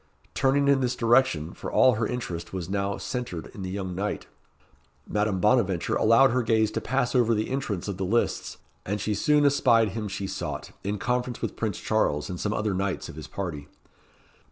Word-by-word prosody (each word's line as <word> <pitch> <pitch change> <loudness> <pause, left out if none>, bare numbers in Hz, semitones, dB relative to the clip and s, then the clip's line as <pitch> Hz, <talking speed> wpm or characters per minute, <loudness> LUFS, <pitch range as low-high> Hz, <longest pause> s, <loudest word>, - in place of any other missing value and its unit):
Turning 140 +1 +2
in 140 -1 +5
this 125 -1 0
direction, 115 -10 +2
for - - -7
all 130 - +5
her 110 -1 0
interest 90 -9 -5
was 90 -3 -4
now 100 +1 -1
centred 125 -10 -5
in 100 - -8
the 95 - -4
young 95 -1 -4
knight, 100 +3 -3 0.8
Madame 105 -2 0
Bonaventure 105 -5 +2
allowed 115 +4 +5
her 125 +1 +2
gaze 110 -2 +2
to - - -2
pass 130 -2 0
over 120 -3 +3
the 110 +3 -2
entrance 115 -10 -2
of 100 -3 -3
the 95 - -2
lists, 115 +6 0 0.3
and 105 +2 -2
she 105 +2 -1
goon 145 +8 +3
espied 120 -6 +4
him 105 +2 -4
she 95 0 -4
sought, - - -5
in 100 +2 -2
conference 125 +3 -1
with - - -3
Prince 105 -5 -2
Charles, 75 -8 0
and 90 - -5
some 105 - -1
other 105 -1 -1
knights 95 0 -2
of - - -9
his 80 - -8
party. 80 -7 -5
105 Hz, 195 wpm, -26 LUFS, 95-125 Hz, 0.8 s, in